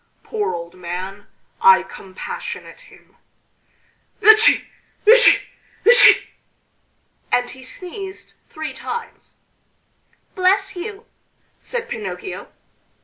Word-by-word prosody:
Poor 425 - -3
old 170 0 -8
man! 185 +3 -7 0.3
I 190 -1 +6
compassionate 325 - -8
him!... - - -21 1.0
Etci! 435 +1 +6 0.4
etci! 480 +3 +7 0.4
etci!" 485 +1 +7 1.1
and 245 0 +1
he 260 +1 -13
sneezed 380 +7 -9 0.2
three 315 0 -6
times. 465 0 -8 1.0
"Bless 390 +1 +1
you!" 405 +4 -7 0.5
said 475 -1 -5
Pinocchio. 440 -4 -6
385 Hz, 85 wpm, -20 LUFS, -, 1.1 s, etci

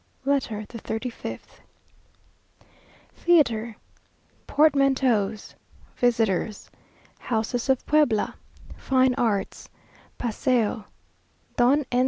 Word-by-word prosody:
LETTER 245 -7 -1
THE 230 - -9
THIRTY 225 +4 -4
FIFTH - - -9 1.5
Theatre 235 -10 +2 0.7
Portmanteaus 270 -8 +2 0.4
Visitors 225 -4 0 0.5
Houses 235 +2 -2
of 265 -1 +1
Puebla 295 -8 +2 0.4
Fine 260 -1 +2
Arts 210 -6 -2 0.5
Paseo 230 -2 0 0.7
Don 265 +4 +3
N. 245 - +2
245 Hz, 75 wpm, -25 LUFS, 220-270 Hz, 1.5 s, Don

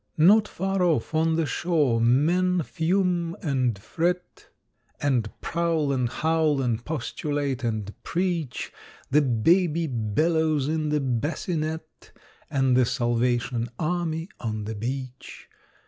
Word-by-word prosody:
= - - -45
Not 205 +7 +6
far 195 +1 -2
off, 165 -3 +1
on 160 +1 +2
the 165 -1 +1
shore, 150 -8 +1
men 170 +9 +3
fume 175 0 0
and 130 -7 0
fret, 175 - -3 0.5
`And 130 -6 +1
prowl 165 -4 0
and 125 -3 0
howl 160 0 +1
and 120 -3 -1
postulate 145 -2 -3
and 110 -3 -2
preach, 170 -7 -2 0.4
The 150 +3 +5
Baby 165 - +2
bellows 150 +5 +1
in 155 0 -1
the 150 0 +1
bassinet, 155 +5 -3 0.4
`And 135 -2 +2
the 125 0 +4
Salvation 120 0 0
Army 165 0 -1
on 110 -2 -3
the 110 - -4
beach. 130 +4 -6
150 Hz, 120 wpm, -25 LUFS, 125-165 Hz, 0.5 s, Not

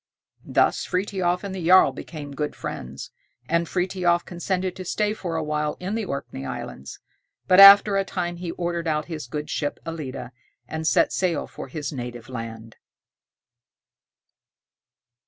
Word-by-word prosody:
Thus - - +2
Frithiof 180 -1 -1
and 200 -1 -5
the 185 -2 -5
jarl 185 +3 +6
became 145 -4 -8
good 150 +1 -3
friends, 65 +2 -7 0.4
and 170 +2 +1
Frithiof 180 -1 +1
consented 180 +1 -2
to 185 - -5
stay 210 +3 0
for 175 -6 -5
a 160 - -1
while 150 0 -2
in 185 +3 -4
the 225 -1 -1
Orkney 140 - -5
Islands; 70 0 -7 0.5
but 185 +1 +6
after 200 +1 +10
a 195 - +2
time 175 -2 -3
he 175 0 -5
ordered 170 -1 -3
out 155 -1 0
his 155 -6 -6
good 150 +4 -4
ship 145 -1 -2
"Ellide," 145 -6 -6 0.4
and 160 +3 -3
set - - +3
sail 175 -5 0
for - - -9
his 145 +1 -5
native 120 -2 -7
land. 115 -2 -7
170 Hz, 150 wpm, -24 LUFS, 145-185 Hz, 0.5 s, after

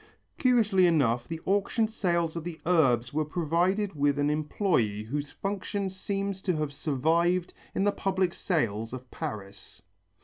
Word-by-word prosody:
Curiously 215 -8 +4
enough 125 -8 +2
the 165 -1 -5
auction 205 +3 +1
sales 170 -6 0
of 165 - -4
the 170 -1 -6
Urbs 130 -9 +3
were 155 +1 +1
provided 175 +6 0
with 145 -1 +1
an 145 0 +2
employé 150 - 0
whose 145 +5 -3
function 200 0 -3
seems 195 0 -3
to 185 -3 0
have 150 -2 -2
survived 165 +6 +1 0.2
in 190 - +1
the 205 - +3
public 190 -3 0
sales 115 - -1
of 130 0 -8
Paris. 100 -2 -7
165 Hz, 145 wpm, -28 LUFS, 140-190 Hz, 0.2 s, Curiously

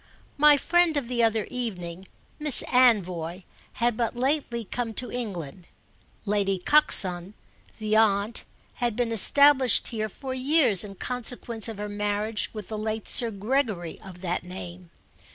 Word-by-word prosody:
My 300 0 +6
friend 345 +1 +2
of 275 -5 -3
the 245 -1 -1
other 225 -2 +1
evening, 190 -7 -6 0.3
Miss 300 -3 +5
Anvoy, 185 -8 +2 0.3
had 235 -1 0
but 235 +1 -2
lately 250 -3 -2
come 225 +2 -4
to 250 - -2
England; 180 - -6 0.6
Lady 200 -2 0
Coxon, 185 - +2 0.4
the 215 -1 -1
aunt, 215 0 +2 0.4
had 240 -3 0
been 240 -1 -1
established 270 +3 +5
here 215 -2 -4
for 260 +5 -7
years 260 - +2
in 200 -2 -9
consequence 240 0 -4
of 225 -3 -7
her 210 0 -5
marriage 210 +1 -2
with 215 -3 -8
the 215 -1 -5
late 220 0 -4
Sir 235 - +4
Gregory 210 - -2
of 180 -2 -12
that 175 -2 -3
name. 180 -1 -10
220 Hz, 145 wpm, -25 LUFS, 195-250 Hz, 0.6 s, My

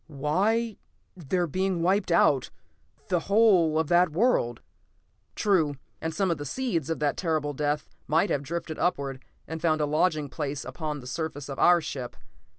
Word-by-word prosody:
"Why 195 +10 0 0.4
they're 175 +1 -1
being 185 +2 -1
wiped 190 +1 +2
out; 145 -6 +3 0.6
the 180 -2 +2
whole 195 -7 +4
of 160 -1 +1
that 175 0 +4
world 160 - +1 0.4
" - - -43
"True. 165 -8 +2 0.3
And 160 - -2
some 185 +3 0
of 165 - -2
the - - -4
seeds 170 - -2
of 165 - -1
that 150 -1 0
terrible 155 -4 -1
death 145 +1 -1 0.2
might 160 +6 +2
have 140 - +1
drifted 160 +2 -5
upward, 140 -6 -1 0.2
and 160 0 -6
found 155 -2 +2
a 150 - +2
lodging 155 0 +1
place 145 0 -4
upon 150 -3 -5
the - - -13
surface 145 +1 -4
of 135 - -6
our 175 -1 +6
ship. 130 -6 -6
160 Hz, 170 wpm, -27 LUFS, 145-180 Hz, 0.6 s, our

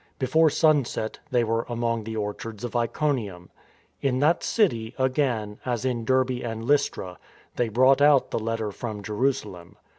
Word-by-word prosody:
Before 155 +5 +3
sunset, 145 -8 +1
they 125 -3 +2
were 115 0 0
among 115 -2 -1
the 110 0 -5
orchards 105 +1 -5
of 120 0 -5
Iconium. 115 - -1 0.5
In 130 -2 +1
that 150 +6 +3
city, 120 - 0
again, 130 -6 0
as 120 -1 -2
in 120 -3 -1
Derbe 130 0 +1
and 115 -1 -4
Lystra, 140 -10 0 0.4
they 120 -2 0
brought 130 +5 +4
out 145 -2 +5
the - - -1
letter 110 -1 -2
from 105 -1 -6
Jerusalem. 105 -6 -2
120 Hz, 150 wpm, -25 LUFS, 110-130 Hz, 0.5 s, out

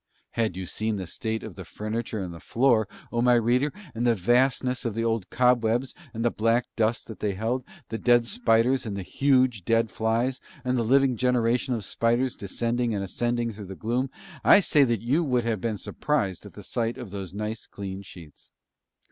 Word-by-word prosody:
Had 110 -6 0
you 95 - -4
seen 110 +4 -2
the 95 -2 -4
state 110 +6 -3
of 110 - -7
the 95 - -8
furniture 110 +2 -4
and 90 -2 -6
the 85 - -10
floor, 115 -2 +2 0.2
O 120 - 0
my 125 0 +5
reader, 125 +5 +2 0.2
and 120 +2 0
the 120 - +4
vastness 125 +5 +2
of 115 -4 -2
the 115 - -1
old 115 -4 -1
cobwebs 125 0 +2 0.2
and 115 0 -3
the 120 - +3
black 115 +2 +2
dust 115 0 +1
that 110 - -10
they 105 -2 -1
held, 115 +6 -1 0.3
the 115 - -3
dead 120 -1 +4
spiders 125 - +2
and 100 -2 -3
huge 130 +1 +2
dead 115 +1 +2
flies, 115 +5 0 0.3
and 125 0 +1
the 120 - +1
living 130 +1 +3
generation 125 +1 +1
of 110 -4 -5
spiders 120 +4 +1
descending 115 +3 -1
and 100 - -2
ascending 120 +4 -1
through 105 0 -8
the 95 +1 -8
gloom, 120 +6 -1 0.3
I - - +8
say 150 -7 +4
that 115 -5 0
you 130 +7 +2
also 165 -5 -1
would 120 -2 +2
have 110 -4 -1
been 110 -3 -1
surprised 100 - -2
at - - -14
the - - -10
sight 115 0 -2
of 105 - -8
those 95 -3 -5
nice 105 +3 -5
clean 95 -1 -6
sheets. 85 -5 -14
115 Hz, 200 wpm, -26 LUFS, 105-125 Hz, 0.3 s, I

